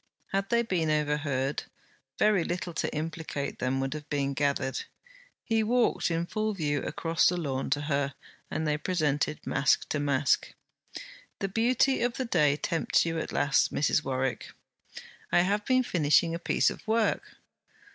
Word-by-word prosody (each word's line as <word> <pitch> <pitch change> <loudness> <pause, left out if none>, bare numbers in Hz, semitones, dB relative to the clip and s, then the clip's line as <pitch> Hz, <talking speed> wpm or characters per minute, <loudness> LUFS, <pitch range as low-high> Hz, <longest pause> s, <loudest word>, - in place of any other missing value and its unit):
Had 195 0 -1
they 235 0 +3
been 180 -8 0
overheard, 150 -2 0 0.5
very 210 -5 +3
little 175 0 -3
to - - -2
implicate 155 -2 -4
them 130 +1 0
would 135 +1 -2
have 150 -1 -8
been 140 -1 -1
gathered. 140 -1 -1 0.6
He 225 -1 +1
walked 235 -1 +2
in 165 0 -1
full 215 +3 -2
view 145 -5 -1
across 165 -1 +1
the 180 - +1
lawn 135 -6 -2
to 145 +2 +1
her, 140 -2 -1 0.3
and 160 - -2
they 150 0 0
presented 150 -4 -1
mask 140 - +2
to 150 - -1
mask. 140 -1 +1 0.8
'The 195 - -3
beauty 240 +6 +2
of 245 0 +1
the 260 - -3
day 150 -10 +3
tempts 165 +2 +1
you 165 -1 -1
at - - -4
last, 145 -1 +2
Mrs. 150 +1 +1
Warwick.' 130 -1 -2 0.8
'I - - +5
have 205 +3 0
been 255 0 +3
finishing 165 -4 +2
a 170 - -3
piece - - +2
of - - -11
work.' 225 0 0
160 Hz, 160 wpm, -28 LUFS, 145-195 Hz, 0.8 s, I